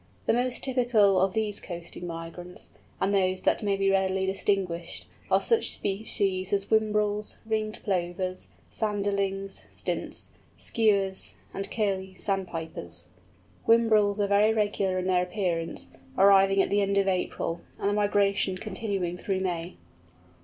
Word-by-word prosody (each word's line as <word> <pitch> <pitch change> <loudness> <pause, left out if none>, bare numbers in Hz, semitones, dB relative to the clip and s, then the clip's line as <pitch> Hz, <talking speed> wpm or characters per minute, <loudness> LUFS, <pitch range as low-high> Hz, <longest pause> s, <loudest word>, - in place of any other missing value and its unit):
The - - +3
most 245 +1 0
typical 235 -7 +4
of 190 0 +2
these 215 -2 -1
coasting 175 0 -6
migrants, 170 +2 -6 0.3
and 195 +1 +1
those 185 -1 +2
that - - +2
may 200 -2 +1
be 195 0 +2
readily 190 0 +1
distinguished, 190 -3 -1 0.2
are - - +5
such 460 -1 +2
species 195 -2 -1
as 200 -1 +1
Whimbrels, 210 -1 +1
Ringed 215 -1 -2
Plovers, 185 -1 -2 0.2
Sanderlings, 200 -2 -1
Stints, - - -4 0.3
Skuas, 200 -4 +1 0.2
and 195 - -4
Curlew 190 -3 -1
Sandpipers. 165 - -4 0.6
Whimbrels 215 -3 +4
are 205 - +3
very 205 +2 +4
regular 205 -3 +1
in 185 - -1
their 185 -1 +3
appearance, 180 -3 -2 0.3
arriving 195 0 +6
at - - -3
the 205 0 +3
end 200 0 +1
of 195 0 +3
April, 180 -2 -1 0.2
and - - 0
the 205 - +2
migration 200 -2 +2
continuing 190 -3 -3
through 190 -2 -1
May. 175 -1 -3
195 Hz, 135 wpm, -28 LUFS, 185-205 Hz, 0.6 s, arriving